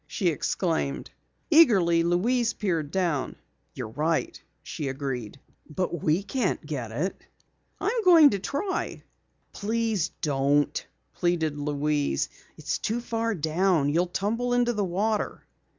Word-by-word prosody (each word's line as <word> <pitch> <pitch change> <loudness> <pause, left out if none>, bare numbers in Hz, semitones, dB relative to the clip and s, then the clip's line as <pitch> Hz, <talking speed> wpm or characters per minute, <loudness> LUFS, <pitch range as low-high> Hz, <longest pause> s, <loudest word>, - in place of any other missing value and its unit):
she 190 -6 0
exclaimed. 160 -2 -1 0.4
Eagerly 195 - +6
Louise 225 +8 +1
peered 165 -8 -1
down. 170 -6 -1 0.4
"You're - - -5
right!" 155 +7 -1 0.2
she 150 - -5
agreed. 135 -4 -4 0.3
"But 170 0 -2
we 160 +5 +1
can't 210 - -1
get 130 -7 -4
it." 160 +12 -2 0.6
"I'm 445 +3 0
going 330 -6 +8
to 200 - -1
try." 370 - -3 0.5
"Please 220 -4 -1
don't," 145 0 +1 0.3
pleaded 170 -4 0
Louise. 145 - -1 0.3
"It's - - -2
too 225 +3 -1
far 230 -1 -2
down. 160 -1 +1
You'll 170 +5 +2
tumble 230 +7 -1
into 240 0 +2
the 210 -2 -1
water." 205 +4 -1
175 Hz, 120 wpm, -26 LUFS, 150-225 Hz, 0.6 s, going